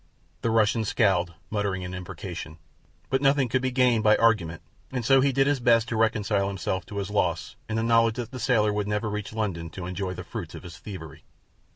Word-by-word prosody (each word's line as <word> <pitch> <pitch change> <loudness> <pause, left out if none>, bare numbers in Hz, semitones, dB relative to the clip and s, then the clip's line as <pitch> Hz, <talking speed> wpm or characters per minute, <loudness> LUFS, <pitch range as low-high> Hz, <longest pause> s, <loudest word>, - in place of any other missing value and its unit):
The 115 - 0
Russian 110 0 +3
scowled, 95 -6 +1 0.2
muttering 100 -3 -1
an 90 - -6
imprecation; 90 -3 -7 0.5
but 135 0 +2
nothing 135 -1 +3
could 125 +2 0
be 130 - 0
gained 125 -3 +3
by 105 0 +6
argument, 95 -8 +2 0.3
and 125 -3 -3
so 135 +1 +6
he 140 +1 +3
did 135 +1 +3
his 140 -1 +1
best 120 -1 +4
to 115 - -2
reconcile 105 -3 +1
himself 95 -1 -3
to 100 - -7
his 100 0 -3
loss 85 -9 0
in 110 - -1
the 110 - 0
knowledge 115 -1 +4
that 120 -1 -5
the 130 - -6
sailor 110 -5 +2
would 105 -1 -1
never 105 +1 -1
reach 105 -2 -4
London 95 -7 -3
to 85 +3 -7
enjoy 90 +1 -3
the 90 - -6
fruits 95 -3 -7
of - - -9
his 85 -3 -10
thievery. 85 -4 -9
105 Hz, 215 wpm, -26 LUFS, 95-115 Hz, 0.5 s, by